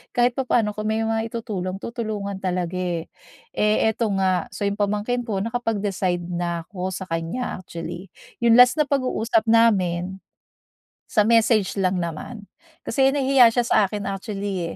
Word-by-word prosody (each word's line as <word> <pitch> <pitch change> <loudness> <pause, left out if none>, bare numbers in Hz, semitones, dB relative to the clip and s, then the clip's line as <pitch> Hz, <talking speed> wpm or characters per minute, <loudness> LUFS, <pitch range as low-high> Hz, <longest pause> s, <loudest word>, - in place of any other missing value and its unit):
kahit 245 0 +4
papaano 240 -5 +1
kung 215 +1 -4
may 220 +1 0
mai-tutulong, 220 -4 -3
tutulungan 210 -4 -4
talaga 180 -1 -2
eh. 175 -2 -3 0.4
Eh 215 +1 +2
ito 225 +1 -1
nga, 190 -1 +1
so - - -7
yung 200 +1 -1
pamangkin 210 +4 -1
ko 200 -2 -1
nakapag-decide 205 -6 -1
na 170 -1 -3
'ko 185 -2 -3
sa 190 0 -4
kanya 170 +6 -3
actually. 175 +1 -7 0.3
Yung 235 -1 +4
last 250 +5 +6
na 300 - +3
pag-uusap 245 -5 +1
namin, 190 -5 +2 0.8
sa 210 - +3
message 220 -3 +3
lang 185 -2 +1
naman. 170 +7 -6 0.4
Kasi 270 0 +2
nahihiya 270 -3 +5
siya 240 +2 +1
sa 235 - +2
akin 205 +1 -5
actually 195 -3 -4
205 Hz, 145 wpm, -23 LUFS, 185-230 Hz, 0.8 s, last